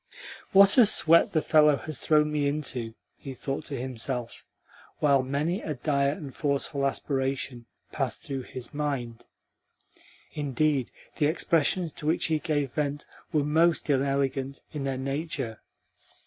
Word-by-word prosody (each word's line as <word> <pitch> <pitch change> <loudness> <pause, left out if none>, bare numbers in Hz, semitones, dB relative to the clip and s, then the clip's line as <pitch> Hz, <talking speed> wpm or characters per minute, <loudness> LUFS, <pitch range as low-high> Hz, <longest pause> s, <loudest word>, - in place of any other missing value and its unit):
"What 195 +4 +7
a 240 - +9
sweat 165 -4 +5
the 155 - +1
fellow 150 -2 +5
has 140 +4 -4
thrown 150 -1 +3
me 145 -1 0
into!" 130 -6 -3 0.2
he 135 -1 -8
thought 135 +4 -4
to 140 -4 -3
himself, 125 -1 -2 0.5
while 140 -3 +3
many 145 - -1
a 155 - -4
dire 140 +1 +1
and 145 -6 -8
forceful 140 -1 -1
aspiration 135 -3 -3 0.2
passed 135 -6 -2
through 135 -3 -4
his 130 +2 -7
mind. 135 -6 -4 1.1
Indeed, 145 -2 0 0.3
the 150 - +3
expressions 165 +1 +1
to 150 - -6
which 160 - +1
he 155 - +2
gave 145 -5 -1
vent 145 -1 -2 0.3
were 150 -2 +2
most 160 +1 +2
inelegant 135 0 -1
in 145 -3 -4
their 135 -1 -2
nature. 135 -4 -4
140 Hz, 140 wpm, -27 LUFS, 135-155 Hz, 1.1 s, a